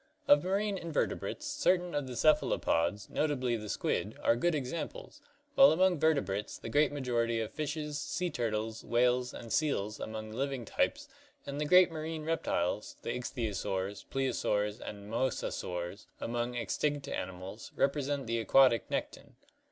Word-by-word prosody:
Of 145 0 +6
marine 195 +1 0
invertebrates, 170 - -2
certain 185 -12 +1
of 145 -2 -1
the 125 - -6
cephalopods, 105 - +2
notably 130 -6 0
the 105 -2 -6
squid, - - -1
are 115 - +4
good 175 +7 +1
examples, 170 - -5 0.3
while 275 -1 +8
among 180 0 +3
vertebrates 105 -11 +1
the - - -7
great 145 +5 +3
majority 120 -5 0
of 110 - -3
fishes, 150 -1 -3
sea 180 -1 -2
turtles, 110 -3 -2
whales, 125 +1 +2
and 115 - -7
seals 110 -9 0
among 110 0 -5
living 135 +1 -2
types - - 0 0.4
and 140 +1 -4
the - - +1
great 180 +2 +6
marine 160 0 -4
reptiles, 105 - -1
the - - -2
ichthyosaurs, 100 -5 -3
plesiosaurs, 110 -5 0
and 100 -1 -8
mosasaurs 100 -6 -3
among 120 +1 -2
extinct 140 +5 -1
animals, 95 +4 -6
represent 140 0 0
the 115 0 -1
aquatic 125 +1 +4
nekton. - - -4
125 Hz, 140 wpm, -32 LUFS, 110-155 Hz, 0.4 s, while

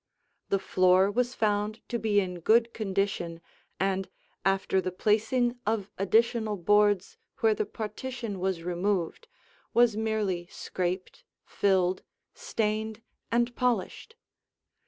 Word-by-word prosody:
The 195 - +3
floor 185 0 +3
was 245 +3 0
found 210 0 0
to 235 - -1
be 210 -1 +2
in 180 -2 -3
good 230 +6 +3
condition 195 -5 -2 0.4
and, 190 0 0 0.3
after 195 0 +2
the 185 0 -3
placing 225 +6 +1
of 210 -2 -1
additional 220 +2 +2
boards 205 +1 +2 0.2
where 225 -2 +5
the 210 -1 -2
partition 225 0 -5
was 185 -2 -1
removed, 180 - -1 0.5
was 235 -2 +5
merely 210 -5 -1
scraped, 185 - -4 0.2
filled, 185 -2 +1 0.3
stained, 220 0 -2 0.3
and 240 +1 +1
polished. 250 - -1
205 Hz, 115 wpm, -28 LUFS, 190-225 Hz, 0.5 s, where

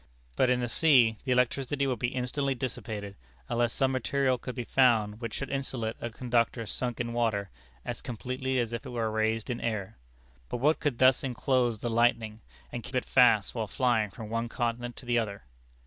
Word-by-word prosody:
But 125 - +3
in 125 0 +2
the 120 - -1
sea 120 -6 +4
the 130 - -1
electricity 130 +3 +1
would 130 -4 -1
be 120 - +1
instantly 130 +2 -1
dissipated, 105 -5 -5 0.3
unless 120 -1 +1
some 135 +2 +1
material 130 0 +1
could 125 - -6
be 125 - -3
found 115 -4 +3
which 115 -2 -4
should 135 - -4
insulate 130 -5 -2
a 120 - -3
conductor 115 0 0
sunk 120 +2 -3
in 120 0 -2
water, 110 -5 0 0.3
as - - -4
completely 130 +2 -3
as 120 -2 0
if 115 - -4
it 135 - -8
were 115 -3 -1
raised 110 +2 0
in 120 - -4
air. 105 - -3 0.5
But - - -2
what 150 +6 +2
could 145 -5 -1
thus 130 0 +5
inclose 125 -3 0
the 120 - -1
lightning, 115 -1 +1 0.3
and - - -4
keep - - -8
it - - +1
fast - - +4
while - - -2
flying 120 -5 +1
from 110 +2 -9
one 115 +1 -1
continent 120 0 -2
to - - -11
the 120 -1 +2
other? 100 -3 -4
120 Hz, 195 wpm, -29 LUFS, 115-130 Hz, 0.5 s, thus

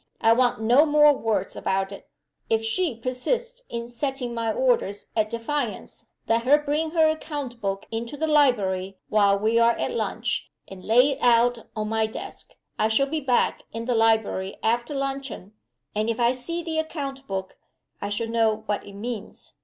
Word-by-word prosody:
I 225 - +5
want 245 -2 +2
no 240 +6 +5
more 295 -1 +6
words 220 -6 -1
about 195 0 -1
it. 200 - -11 0.4
If 225 0 +1
she 290 +4 0
persists 465 - -3
in 235 0 -4
setting 250 0 -3
my 230 -1 -1
orders 475 - 0
at 215 -1 +1
defiance, 235 +1 -4 0.2
let 230 +1 +3
her 270 +5 +5
bring 300 +2 -1
her 320 -1 +4
account 290 -6 -4
book 195 -1 -2
into 230 +5 -4
the 315 - 0
library, 200 -11 +2
while 200 -2 +4
we 220 +3 +2
are 235 0 +5
at - - -2
lunch, 475 - -2 0.2
and 190 -1 -11
lay 250 +6 +5
it 275 - -4
out 240 -1 +3
my 220 +1 0
desk. 220 - -9 0.2
I 215 - +3
shall 220 +5 +3
be 310 +3 -2
back 255 -3 +1
in 230 +1 -4
the 250 - +1
library 220 -4 +1
after 240 +5 0
luncheon 275 -7 -4 0.4
and 215 +2 0
if 230 - -2
I 240 0 +4
see 335 +7 -4
the 320 -1 -2
account 275 -4 -5
book 190 -1 -4 0.4
I 200 - -3
shall 215 +3 -2
know 225 -1 +1
what 210 -1 -2
it 200 - -10
means. 215 +1 -7
235 Hz, 175 wpm, -25 LUFS, 220-280 Hz, 0.4 s, more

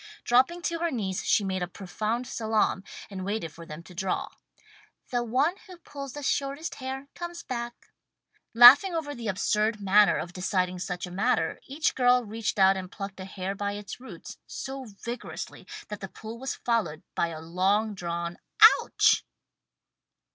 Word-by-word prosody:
Dropping 260 +9 +3
to 335 0 -1
her 340 0 +1
knees 195 - -2
she 210 - +3
made 190 -1 -2
a 180 - -1
profound 215 +7 -3
salaam, 220 -5 0 0.3
and 190 -1 -5
waited 200 -5 -3
for 165 0 -11
them 155 +2 -8
to 175 - -14
draw. 185 +1 -2 0.8
"The 245 -1 +1
one 260 +8 +2
who 365 -2 -11
pulls 280 -5 -8
the 290 - -7
shortest 280 +4 -1
hair 265 +1 -5
comes 345 0 -7
back." 240 -1 -4 0.8
Laughing 280 +10 +9
over 300 -3 -3
the 235 -4 -6
absurd 210 +3 +1
manner 205 +1 +5
of 175 - -5
deciding 180 -1 -1
such 180 0 -4
a 180 - -10
matter, 185 -4 0
each 290 +4 0
girl 250 -1 +4
reached 215 +1 -3
out 190 0 +5
and 185 0 -6
plucked 195 -1 -7
a 185 - -6
hair 190 0 -4
by 200 0 -3
its 205 +2 -7
roots, 260 - -10
so 270 0 -6
vigorously 235 +3 -7 0.2
that 210 - -5
the 195 - -6
pull 220 +4 -9
was 265 +1 -3
followed 210 -10 -1
by - - +1
a 165 -2 -7
long 190 +6 +1
drawn 170 -2 -4 0.4
"ouch!" - - +3
215 Hz, 170 wpm, -27 LUFS, 185-255 Hz, 0.8 s, Laughing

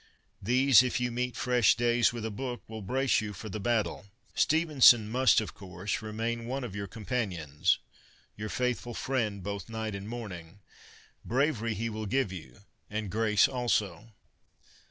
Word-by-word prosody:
These, 130 +4 +5
if 125 0 -1
you 125 0 -1
meet 125 +1 -2
fresh 125 -2 +3
days 120 0 +3
with 115 -2 -5
a 110 - -3
book, 125 +3 -5
will 110 -1 -7
brace 130 +4 +1
you 105 -1 -5
for 110 +4 -8
the 110 - -5
battle. 110 -2 -1 0.3
Stevenson 145 -8 +5
must, 125 +4 +4
of 110 - -5
course, 95 +1 -5
remain 115 +2 -3
one 135 +2 -3
of 110 -6 -6
your 100 0 -4
companions 95 - -1 0.3
— - - -31
your 105 +1 -5
faithful 125 -1 -2
friend 110 -7 -2
both 100 +1 -5
night 110 -1 -4
and 100 +2 -6
morning. 100 -6 -8 0.6
Bravery 120 -4 0
he 115 +3 -2
will 110 -1 -4
give 130 -1 0
you, 80 -5 -10 0.3
and 105 -2 -4
grace 105 -1 +3
also. 115 -6 -1
110 Hz, 160 wpm, -29 LUFS, 100-125 Hz, 0.6 s, These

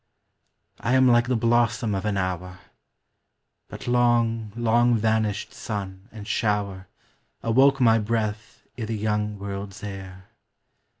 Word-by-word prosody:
I 125 +4 +1
am 130 0 +5
like 120 0 +4
the 125 - +1
blossom 115 -1 +1
of 95 +1 -2
an 105 -2 0
hour. 90 -1 -3 1.1
But - - -9
long, 120 -3 +2
long 120 +1 +3
vanished 110 -1 0
sun 100 -1 -6
and 105 -2 -10
shower 100 -3 -1 0.6
Awoke 135 +4 +4
my 115 -3 +5
breath 110 -1 -3 0.2
i' 110 - -2
the 110 0 -3
young 105 0 -1
world's 100 0 -7
air. 95 -2 -8
110 Hz, 125 wpm, -25 LUFS, 100-120 Hz, 1.1 s, am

